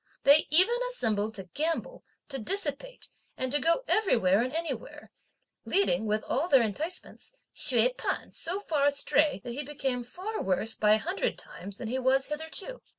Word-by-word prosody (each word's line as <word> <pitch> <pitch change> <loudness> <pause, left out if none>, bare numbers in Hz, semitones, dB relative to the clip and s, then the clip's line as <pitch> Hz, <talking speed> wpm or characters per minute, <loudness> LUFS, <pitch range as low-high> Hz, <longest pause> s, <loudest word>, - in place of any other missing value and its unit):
They 290 +2 +6
even 370 +11 +5
assembled 220 - -1
to 195 - -5
gamble, 330 +11 -3 0.3
to 270 -2 -4
dissipate 390 - -1 0.3
and 260 -1 -3
to 290 - +2
go 335 +9 +2
everywhere 225 - +3
and 255 +2 -2
anywhere; 330 +2 -5 0.5
leading, 200 -2 +1
with 215 +1 0
all 310 +6 -1
their 270 -7 +5
enticements, 305 - -3 0.2
Hsüeh 250 -4 +3
P'an - - -3
so 360 +4 -2
far 305 -8 0
astray, 285 -3 +2
that 240 - -6
he 280 - -3
became 270 -3 -3
far 370 - -6
worse, 195 +4 0
by 210 0 +4
a 215 - -4
hundred 365 +3 -1
times, 200 +2 -8
than 235 - -6
he 255 +3 -2
was 265 +1 +2
hitherto. 320 +11 -4
280 Hz, 165 wpm, -28 LUFS, 225-330 Hz, 0.5 s, They